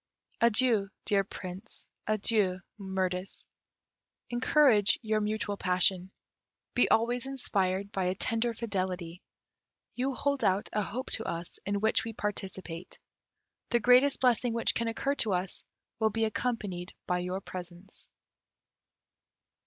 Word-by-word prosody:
Adieu, 230 -3 +5 0.2
dear 200 -1 +3
Prince, 190 +2 -6 0.2
adieu, 210 -3 +2 0.2
Mirtis. 190 -1 -2 0.9
Encourage 240 -4 +4
your 215 -1 +1
mutual 210 -1 -1
passion. 185 0 +2 0.6
Be 245 - +3
always 240 +3 +2
inspired 200 -7 0
by 190 -1 -1
a 180 +1 0
tender 230 +2 0
fidelity. 185 -6 -3 0.7
You 260 +1 -1
hold 280 0 0
out 190 +2 +2
a 210 - +1
hope 240 +6 -4
to 225 - +2
us 170 0 -5
in 200 0 0
which 220 +1 +3
we 225 - -5
participate. 190 -4 -5 0.7
The 240 - +3
greatest 250 +4 +5
blessing 245 -2 +3
which 230 - +2
can 230 - -1
occur 250 +5 0
to 210 - +2
us 180 0 -2 0.4
will 220 -1 +3
be 225 +1 0
accompanied 210 -6 -3
by 180 0 0
your 180 +2 -2
presence." 180 0 -8
205 Hz, 125 wpm, -30 LUFS, 185-230 Hz, 0.9 s, Adieu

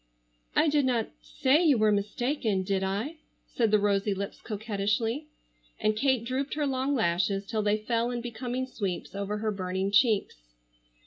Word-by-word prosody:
"I - - +4
did 295 -2 +3
not 240 -4 +1
say 280 +6 +2
you 295 -6 +5
were 215 -1 +4
mistaken, 210 0 0
did 190 0 0
I?" 210 +12 -2 0.3
said 230 -3 0
the 215 - +5
rosy 200 0 +1
lips 200 +1 -5
coquettishly, 220 +5 -2 0.5
and 215 0 +1
Kate 255 0 +1
drooped 265 +4 -2
her 300 -1 0
long 270 +1 0
lashes 195 -1 +1
till 215 +2 -1
they 210 0 +2
fell 230 +2 0
in 245 -1 -2
becoming 245 +2 -3
sweeps 200 -9 -4
over 200 +1 -3
her 215 0 -1
burning 190 0 -2
cheeks. 205 - +3
220 Hz, 165 wpm, -28 LUFS, 200-255 Hz, 0.5 s, you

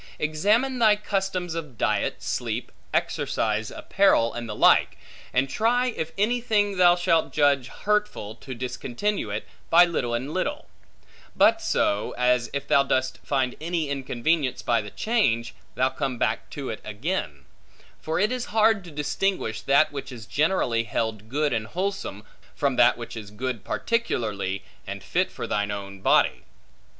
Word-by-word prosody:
Examine 210 - +1
thy 215 -3 +6
customs 195 -4 -2
of 155 -8 -6
diet, - - 0
sleep, - - -3 0.2
exercise, 110 0 0
apparel, 195 -12 +2
and 120 -1 -5
the 105 - -4
like; - - +4 0.3
and 130 +2 +2
try, 235 - +1
in 160 -8 -3
any 235 +5 +1
thing 205 -4 +1
thou 175 -1 +6
shalt 175 -2 +1
judge 140 -4 +3
hurtful, 210 - -1
to 130 +3 -9
discontinue 125 - -2
it, 105 +1 -4 0.2
by 175 +1 +8
little 125 -9 -1
and 135 +6 -4
little; 185 - -2 0.7
but - - +4
so, 100 +1 0
as 125 -1 +2
if 140 0 -4
thou 140 - +5
dost 130 -1 0
find 130 -3 0
any 165 -2 -1
inconvenience 135 +1 -1
by 120 -2 +2
the 105 - -8
change, 120 - 0 0.2
thou 130 +1 +2
come 130 -1 -3
back 110 0 -1
to 140 -2 -5
it - - -7
again: 105 - -3 0.6
for 160 +2 -1
it 210 +4 +2
is 250 -1 -2
hard 220 -2 +3
to 175 - -10
distinguish 145 - -1
that 140 +5 +4
which 140 -1 -6
is 115 -4 -9
generally 140 - +1
held 110 -1 -3
good 145 +1 0
and 110 -2 -1
wholesome, 185 - -3 0.3
from 140 -3 0
that 120 -1 +5
which 120 0 -7
is 110 -3 -7
good 115 +1 -4
particularly, 105 - -1 0.2
and - - -6
fit - - 0
for - - -5
thine 105 0 -1
own 100 -1 -6
body. - - +3
140 Hz, 160 wpm, -25 LUFS, 115-185 Hz, 0.7 s, by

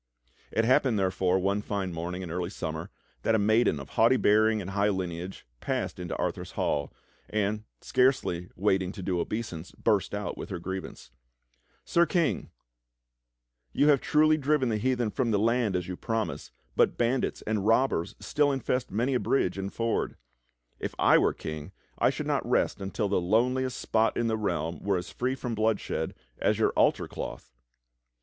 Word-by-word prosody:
It 115 - +1
happened, 125 -1 +3
therefore, 95 -1 +2
one 100 +2 0
fine 100 -4 -3
morning 90 +3 -4
in 85 - -6
early 90 0 -2
summer, 80 -2 -5 0.3
that 115 - +2
a - - +4
maiden 110 -6 +3
of 70 +1 -9
haughty 115 +3 +4
bearing 110 0 +4
and 100 -1 -5
high 100 +1 +2
lineage 90 -1 -4
passed - - -2
into 90 -2 -4
Arthur's - - -3
hall, 70 -2 -1 0.4
and, 105 0 -1 0.2
scarcely 125 -9 +1
waiting 95 -1 +1
to 95 - -7
do 90 -1 0
obeisance, 90 -4 -4
burst 105 -3 +1
out 105 0 -4
with - - -6
her 95 - -3
grievance: 95 +2 -6 0.7
"Sir 170 0 +3
King, 170 -5 0 1.2
you 145 - +4
have 140 -3 +5
truly 155 +1 +4
driven 145 -3 +1
the 110 -2 0
heathen 125 -1 0
from 125 -1 0
the 105 - +2
land 115 -1 +2
as 90 -1 -1
you 90 - -4
promised, 115 +2 -3 0.2
but - - +3
bandits 125 +2 0
and 105 -2 -1
robbers 115 -7 +2
still 145 -1 +1
infest 130 -1 -1
many 120 +6 0
a 125 - +2
bridge 105 -10 +1
and 100 0 -4
ford. 115 0 -1 0.6
If - - -4
I - - +6
were - - +3
king 80 -1 -6 0.3
I - - +4
shoidd - - -3
not - - -1
rest - - +1
until 100 +2 -1
the 100 -2 +1
loneliest 125 +7 +1
spot 110 0 +1
in 120 - +1
the 110 -1 +1
realm 85 -6 -2
were 100 -1 +1
as 90 - -6
free 130 +2 -1
from 125 -2 -4
bloodshed 110 -1 -1 0.2
as - - +2
your - - +3
altar - - +2
cloth." - - -7
105 Hz, 175 wpm, -28 LUFS, 95-120 Hz, 1.2 s, I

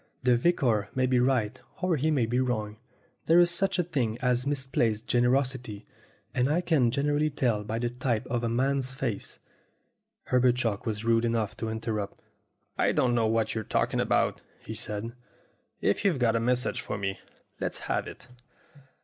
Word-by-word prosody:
The 125 -1 +4
vicar 120 -7 +1
may 130 0 +2
be 125 -1 +2
right 125 -2 +1 0.2
or 185 -2 +1
he 155 +2 0
may 140 -7 +2
be 120 +3 0
wrong. 110 -4 -1 0.5
There 165 - +6
is 175 0 +6
such 195 +3 +1
a 180 - +2
thing 130 -10 -1
as 125 +1 +1
misplaced 130 -6 0
gener 120 0 +2
osity, 125 -6 -5 0.5
and 125 +1 +1
I 155 +4 +2
can 155 -9 +2
generally 145 +4 +1
tell 120 -7 0
by 110 +2 -3
the 120 0 -1
type 120 -2 -1
of 120 -1 -2
a 115 - 0
man's 130 +2 0
face 120 -7 -3 0.4
" - - -50
Herbert 125 -1 +4
Chalk 115 -3 -2
was 110 0 -3
rude 115 0 +3
enough 115 -3 0
to 110 - -3
interrupt. 110 -2 -3 0.6
"I - - +3
don't 125 -1 +2
know 115 -2 +2
what 110 0 +1
you're 110 - -3
talking - - 0
about," - - +1 0.2
he 110 - -7
said. 110 0 -4 0.7
"If 100 - +1
you've 185 -7 +2
got 120 -3 +2
a - - +2
message 125 +2 0
for - - -4
me, 100 -1 -3 0.4
let's - - -2
have - - -1
it." - - -11
120 Hz, 185 wpm, -28 LUFS, 115-135 Hz, 0.7 s, There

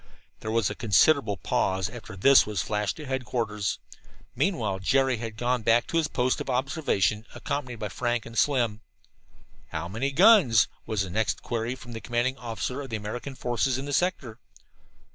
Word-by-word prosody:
There 110 - -6
was 110 -3 +1
a - - -3
considerable 115 0 +3
pause 95 -1 0
after 110 -2 -9
this 135 +8 +7
was 105 -6 -2
flashed 105 -1 -2
to 155 - -8
headquarters. 120 -6 -2 0.6
Meanwhile 120 - 0
Jerry 130 +5 +2
had 115 -1 -6
gone 125 +1 0
back 115 +2 +3
to 165 - -2
his 160 -2 +2
post 125 -1 0
of - - -6
observation, 125 - 0
accompanied 130 -4 -3
by 105 -2 -5
Frank 120 +4 -2
and 115 - -10
Slim. 120 -6 +1 0.9
"How 80 +2 -4
many 115 +9 -2
big 140 - -10
guns?" 175 - +6 0.2
was 105 -3 0
the 95 - -6
next 110 +4 -1
query 115 +1 -2
from 120 -2 -12
the 115 - -6
commanding 120 +2 -1
officer 120 +3 -4
of 135 - -8
the 115 - -3
American 120 +6 -6
forces 125 +1 0
in 135 - -5
the 145 - -4
sector. 140 -9 -1
120 Hz, 180 wpm, -27 LUFS, 110-135 Hz, 0.9 s, this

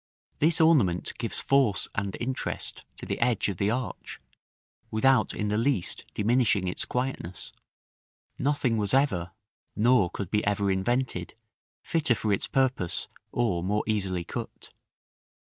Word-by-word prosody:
This 160 +2 +4
ornament 135 - +3
gives - - 0
force 130 -10 +2
and 100 -1 -3
interest 130 +2 -2
to - - -7
the - - -3
edge 120 -3 +2
of 95 - -4
the 100 +2 +1
arch, 120 -3 -4 0.7
without 120 0 +3
in 105 - -2
the 105 +1 +1
least 120 -7 +1
diminishing 110 -3 +2
its 90 - -2
quietness. 125 -8 -4 0.9
Nothing 135 -4 +1
was 105 +3 +1
ever, 95 -11 +1 0.5
nor 110 -4 +4
could 95 0 -6
be 105 - +1
ever 100 -1 +1
invented, 95 -1 -1 0.5
fitter 155 -7 +2
for 105 -2 0
its 100 - -1
purpose, 130 - 0 0.2
or 105 -8 0
more 105 +3 0
easily 95 -5 -1
cut. - - -8
110 Hz, 135 wpm, -27 LUFS, 95-130 Hz, 0.9 s, This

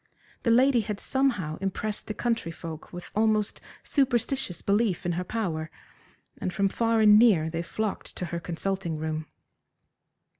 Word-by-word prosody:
The 235 - 0
lady 250 +1 +5
had 210 -1 -4
somehow 235 - 0
impressed 205 +2 -3
the 215 - -4
country 230 -8 -1
folk 165 -2 -8
with 175 0 -9
almost 215 -1 +1 0.2
superstitious 260 - 0
belief 200 -3 +1
in 175 - +1
her 175 +2 -1
power, 175 -7 -2 0.7
and 185 - -2
from 195 +1 +1
far 230 +1 +2
and 210 0 +8
near 180 -9 +4
they 165 0 -2
flocked 210 +4 -4
to 180 - -3
her 170 0 -3
consulting 175 0 -3
room. 155 0 -3
200 Hz, 150 wpm, -27 LUFS, 170-230 Hz, 0.7 s, and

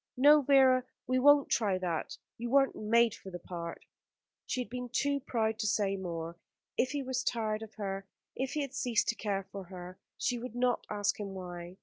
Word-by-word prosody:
No, 295 +3 +7
Vera, 265 -2 +5 0.2
we 255 0 +2
won't 290 +1 +6
try 205 -5 +2
that. 175 -3 -3 0.2
You 240 +1 -3
weren't 270 +1 +4
made 230 +1 +3
for 190 - -10
the 175 - -6
part." 170 -1 -7 0.6
She - - -1
had 245 - -5
been 250 0 -4
too 280 +3 +1
proud 225 -4 -1
to 215 - 0
say 200 -2 +1
more. 170 -3 -5 0.4
If 255 - +2
he 290 -2 -2
was 260 -1 -2
tired 215 -2 -1
of 220 -1 -9
her 195 -2 -4 0.3
if 265 +1 -2
he 300 - 0
had 275 -2 -4
ceased 245 -5 +1
to 235 - +1
care 200 -3 -2
for 195 -2 -6
her, 180 0 -9 0.2
she 245 -2 0
would 240 -1 -7
not 245 0 +1
ask 205 0 0
him 200 -2 -5
why. 175 -1 -7
225 Hz, 205 wpm, -32 LUFS, 195-255 Hz, 0.6 s, No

